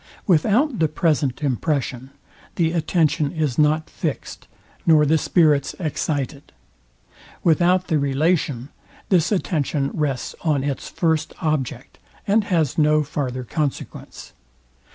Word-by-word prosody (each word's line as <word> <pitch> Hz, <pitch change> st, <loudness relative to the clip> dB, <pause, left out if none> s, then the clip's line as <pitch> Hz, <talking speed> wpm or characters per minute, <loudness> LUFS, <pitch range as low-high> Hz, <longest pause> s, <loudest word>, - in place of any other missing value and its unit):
Without 215 Hz, -, +2 dB
the 160 Hz, -, +3 dB
present 150 Hz, -4 st, 0 dB
impression, 135 Hz, -1 st, -1 dB, 0.5 s
the 165 Hz, -2 st, +1 dB
attention 155 Hz, -3 st, +1 dB
is 155 Hz, -6 st, -1 dB
not 155 Hz, +1 st, +2 dB
fixed, -, -, -5 dB, 0.4 s
nor 155 Hz, -2 st, +5 dB
the 155 Hz, +2 st, +3 dB
spirits 150 Hz, -4 st, +2 dB
excited. 145 Hz, -3 st, -3 dB, 0.9 s
Without 175 Hz, +2 st, +3 dB
the 160 Hz, -4 st, +1 dB
relation, 140 Hz, -2 st, 0 dB, 0.4 s
this 175 Hz, -2 st, +3 dB
attention 150 Hz, -7 st, -1 dB
rests 140 Hz, -5 st, -2 dB
on 150 Hz, -5 st, +1 dB
its 140 Hz, -1 st, -3 dB
first 160 Hz, -3 st, -1 dB
object, 140 Hz, -5 st, -3 dB, 0.3 s
and 205 Hz, +1 st, +2 dB
has 165 Hz, -7 st, 0 dB
no 150 Hz, 0 st, +4 dB
farther 130 Hz, -3 st, -3 dB
consequence. 145 Hz, +3 st, -5 dB
155 Hz, 110 wpm, -22 LUFS, 140-165 Hz, 0.9 s, nor